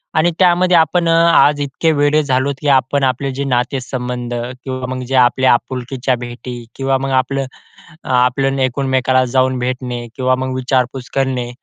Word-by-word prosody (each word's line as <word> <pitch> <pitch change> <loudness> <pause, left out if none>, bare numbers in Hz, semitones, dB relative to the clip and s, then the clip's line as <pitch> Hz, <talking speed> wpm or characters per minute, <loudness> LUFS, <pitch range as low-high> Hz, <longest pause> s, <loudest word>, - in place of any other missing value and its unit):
आणि 160 +2 +3
त्यामध्ये 180 -1 +4
आपण 170 +1 +2
अ, - - +4 0.2
आज 145 0 +4
इतके 145 +4 0
वेडे 145 +1 +3
झालोत 135 +1 0
की 150 - -3
आपण 135 +1 +2
आपले 135 +1 0
जे 140 +2 -3
नातेसंबंध 125 -1 -3 0.3
किंवा 130 -1 -5
मग 130 - -5
जे 135 - -2
आपल्या 130 0 +4
आपुलकीच्या 130 +1 -2
भेटी 120 0 -7
किंवा 135 0 0
मग 135 0 -3
आपलं 135 +1 -3 0.7
आपलं 135 +2 +1
एकमेकाला 130 0 +1
जाऊन 130 0 +2
भेटणे 125 -1 -4
किंवा 130 0 +1
मग 130 0 -3
विचारपूस 130 0 -1
करणे. 130 -3 -1
130 Hz, 155 wpm, -17 LUFS, 125-135 Hz, 0.7 s, त्यामध्ये